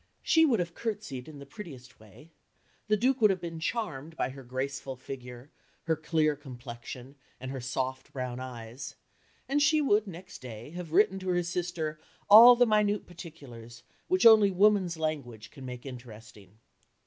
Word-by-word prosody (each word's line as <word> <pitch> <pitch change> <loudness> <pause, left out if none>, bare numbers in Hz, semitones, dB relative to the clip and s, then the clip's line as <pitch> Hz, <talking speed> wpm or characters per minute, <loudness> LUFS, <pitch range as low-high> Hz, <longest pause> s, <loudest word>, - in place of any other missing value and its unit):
She 320 0 +5
would 235 -7 +2
have 170 -1 -2
curtsied 205 - -5
in 155 -2 -10
the 140 - -10
prettiest 140 - -11
way, 110 - -17 0.6
the 215 0 +3
Duke 255 +4 +1
would 215 - +7
have 190 -1 0
been 165 -2 -6
charmed 165 - -4
by - - 0
her 135 +1 -10
graceful 130 +2 -4
figure, 125 0 -9 0.3
her 165 -1 +1
clear 155 -1 +1
complexion, 125 -1 -10 0.2
and 130 0 -6
her 135 -1 -5
soft 130 +1 -3
brown 125 -2 -4
eyes, 120 -1 -8 0.5
and 285 +2 +1
she 310 +1 +4
would 215 -7 +2
next 180 0 -10
day 120 +1 -9
have 175 -2 -7
written 190 +2 +3
to 185 0 -5
her 175 -1 +1
sister 170 -3 -3 0.3
"all 235 +4 +11
the 245 +1 +5
minute 210 -2 +1
particulars, 135 -10 -12 0.2
which 370 +2 +2
only 220 -3 +8
woman's 190 -3 +3
language 135 -9 -4
can 135 -3 -10
make 125 0 -8
interesting." 110 -6 -12
155 Hz, 165 wpm, -29 LUFS, 125-195 Hz, 0.6 s, all